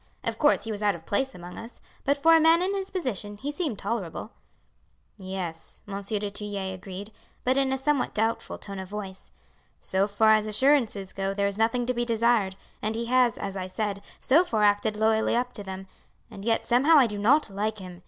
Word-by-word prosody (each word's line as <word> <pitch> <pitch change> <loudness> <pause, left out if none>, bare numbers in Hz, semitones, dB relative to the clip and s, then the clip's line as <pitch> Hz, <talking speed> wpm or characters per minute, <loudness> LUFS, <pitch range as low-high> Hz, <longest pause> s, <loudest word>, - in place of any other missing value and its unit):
Of - - -3
course 295 - +4
he 225 - -4
was 210 -1 -4
out 205 -2 +2
of 165 -1 -12
place 265 +6 -1
among 175 0 -9
us, 230 +2 -11 0.3
but 280 +1 +2
for 330 +3 +6
a - - +6
man 325 +2 +5
in 385 +2 0
his 390 -1 -3
position 220 - -3
he 285 +7 -4
seemed 295 - -3
tolerable." 205 0 -4 0.8
"Yes," 185 -4 -7
Monsieur 200 +1 -3
du 205 0 -3
Tillet 200 -2 -4
agreed, 190 +2 -8 0.3
but 255 +1 +2
in 270 -1 +2
a 265 - +1
somewhat 275 0 0
doubtful 225 +2 -1
tone 195 -1 -7
of 190 -1 -7
voice. 195 -2 -7 0.5
"So 190 +1 +1
far 220 +1 +4
as 215 0 +2
assurances 215 -4 +2
go 195 0 -2
there 200 0 +1
is 200 +1 -2
nothing 235 +2 +2
to 250 - 0
be 240 0 -1
desired, 230 -4 +2 0.3
and 215 +1 -2
he 230 +1 -2
has, 250 -3 +4
as 195 - -5
I 185 -1 -4
said, 200 +1 -3 0.2
so 310 +7 +4
far 220 -11 0
acted 205 +1 +3
loyally 220 +1 +2
up 245 +1 -1
to 205 - -6
them, 190 0 -7 0.5
and 195 - -9
yet 225 -1 +1
somehow 275 +7 +5
I 270 - +7
do 210 -3 -3
not 245 +3 +3
like 210 +2 -2
him. 180 -3 -9
215 Hz, 210 wpm, -26 LUFS, 195-250 Hz, 0.8 s, I